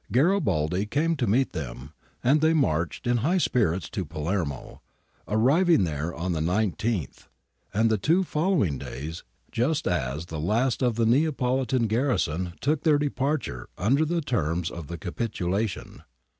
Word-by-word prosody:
Garibaldi 105 - +2
came 155 +8 +1
to 125 -4 0
meet 130 +6 +2
them, 70 0 -7 0.3
and 145 +5 +4
they 160 +1 +4
marched 85 - 0
in 120 0 +2
high 155 +11 +1
spirits 95 - +1
to - - -3
Palermo, 75 -3 -4 0.5
arriving 140 - +4
there 80 -1 -2
on 85 +2 -3
the 80 - -1
19th 95 - -1 0.4
and 110 +3 +2
the 110 - +1
two 165 - +3
follow 170 0 +1
ing 70 -6 -3
days, 80 +5 -6 0.3
just 140 +7 0
as 75 -2 -1
the 80 -2 -6
last 115 - +1
of 120 -3 +2
the 115 0 +2
Neapolitan 130 -1 +2
garrison 105 - 0
took 150 +1 +1
their 155 -3 +4
departure 140 - -2
under 130 - +2
the 170 +2 0
terms 85 - -1
of 85 -4 -7
the 85 - -6
capitulation. 95 +2 -3
110 Hz, 150 wpm, -26 LUFS, 85-140 Hz, 0.5 s, and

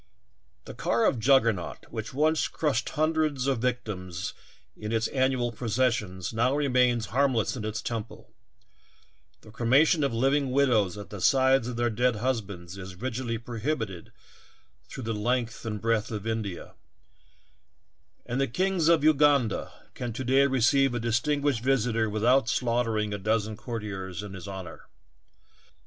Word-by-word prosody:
The - - -8
car 115 +1 +1
of 125 - +2
Juggernaut, 115 -6 +2
which 110 0 -5
once 155 +3 +2
crushed 135 -7 -1
hun 155 +1 +1
dreds 150 -5 0
of 135 -3 +1
victims 105 -8 -3 0.4
in 105 0 -6
its 115 0 +1
annual 130 -2 +1
processions, 115 -5 -1
now 125 +5 +2
remains 125 -5 +2
harmless 130 -5 +2
in 120 - -5
its 110 0 -4
temple; 115 -1 -6 1.1
the 110 - -15
cremation 140 +8 +3
of 140 - +1
living 135 +4 +1
widows 120 -8 +2
at 105 - -9
the 105 -3 -7
sides 130 0 +4
of 125 - -4
their 120 0 0
dead 125 +2 +1
husbands 100 -6 -3
is 95 0 -8
rigidly 120 +2 -3
prohibited 115 - -4 0.8
through 130 - -7
the 115 0 -2
length 120 +2 -2
and 105 -1 -3
breadth 115 0 0
of 105 -3 -5
India; 110 -5 -4 1.5
and 125 +3 -2
the 135 - +2
King 185 +7 0
of 165 -3 +4
Uganda 145 -6 +3 0.2
can 120 -2 -5
to 130 - -4
day 135 +2 +4
receive 135 0 +3
a - - -1
distinguished 120 +3 0
visitor 115 -4 +1
without 115 +4 +2
slaughtering 115 -3 0
a 100 - -3
dozen 110 +1 0
courtiers 105 -5 -5
in 100 -2 -8
his 95 0 -8
honor. 95 -3 -8
120 Hz, 145 wpm, -27 LUFS, 110-130 Hz, 1.5 s, sides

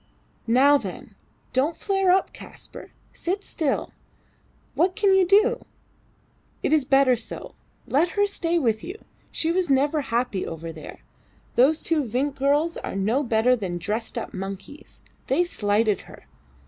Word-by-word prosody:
Now, 275 +5 +5
then! - - -8 0.4
Don't 280 +6 +1
flare 390 -2 0
up, 375 +1 +2
Kaspar. - - -12 0.2
Sit 385 +4 -2
still. 295 -4 -2 0.8
What 365 +1 +1
can 405 -3 +3
you 380 -2 +4
do? 435 +6 +3 1.0
It - - +1
is 300 -4 +3
better 270 -1 +4
so. 230 - -7 0.3
Let 325 +6 +1
her 410 - +4
stay 345 -4 0
with 225 -8 0
you. 370 +4 -6 0.4
She 325 - 0
was 360 -1 0
never 285 +3 +2
happy 235 -6 -1
over 165 0 -6
there. 155 - -11 0.5
Those 285 +6 +3
two 320 -3 +1
Vinck 260 +4 -1
girls 285 +5 +1
are - - -6
no 215 +8 +1
better 240 -1 +2
than 190 -7 -4
dressed 215 +7 -3
up 230 - -5
monkeys. 195 +9 -8 0.3
They 350 - +2
slighted 210 - 0
her. - - -15
275 Hz, 150 wpm, -24 LUFS, 225-345 Hz, 1.0 s, Now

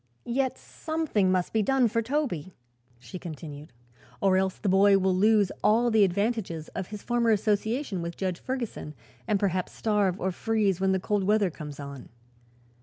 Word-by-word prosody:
"Yet 260 +2 -1
something 315 - -1
must 180 -1 0
be 220 - +3
done 260 +3 +3
for 230 +1 0
Toby," 230 - -2 0.4
she 125 +9 -9
continued, 155 -3 -8 0.5
"or 190 +4 +3
else 190 0 +1
the - - -4
boy 195 +1 +5
will 190 -1 +1
lose 205 0 +3
all 235 +3 +4
the 220 -2 +5
advantages 195 -4 -1
of 190 -2 -5
his 210 -1 -8
former 240 -1 +1
association 215 - 0
with 170 0 -5
Judge 185 -3 -2
Ferguson 235 - -5 0.3
and 210 -2 +2
perhaps 185 -2 -1
starve 205 -4 0
or 190 - -1
freeze 205 -2 0
when 190 0 +3
the 190 - +1
cold 205 +1 0
weather 205 -2 +2
comes 150 -3 -9
on. 140 -2 -8
200 Hz, 170 wpm, -27 LUFS, 180-225 Hz, 0.5 s, boy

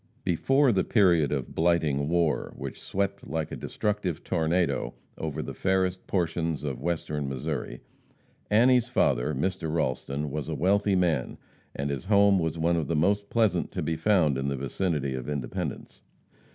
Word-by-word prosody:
Before 135 - +3
the 95 -4 +2
period 85 - +3
of 70 -4 -3
blighting 80 -4 +1
war, 85 -2 +1
which - - -7
swept 100 0 -2
like 80 -2 -3
a - - -4
destructive 105 -6 -2
tornado 80 -6 0 0.2
over 75 -3 -4
the - - -6
fairest 95 -1 0
portions 85 -4 -1
of 65 -4 -4
Western 75 -3 -2
Missouri, 65 -2 -4 0.7
Annie's 120 +2 +4
father, 70 - +1
Mr. 85 +2 -2
Ralston, 70 -1 -2
was 75 -1 -4
a - - -2
wealthy 100 +2 +2
man, 85 -8 0 0.4
and 70 +1 -2
his 70 +3 -4
home 100 -1 +5
was 80 -1 -1
one 85 +1 +2
of 80 -4 -1
the 85 - 0
most 100 +6 +1
pleasant 110 -7 +1
to - - -2
be 80 - -1
found 80 -8 +2
in 70 - -2
the 70 -1 -1
vicinity 70 +1 -1
of 65 +2 -5
Independence. 70 -5 -4
85 Hz, 160 wpm, -27 LUFS, 70-95 Hz, 0.7 s, home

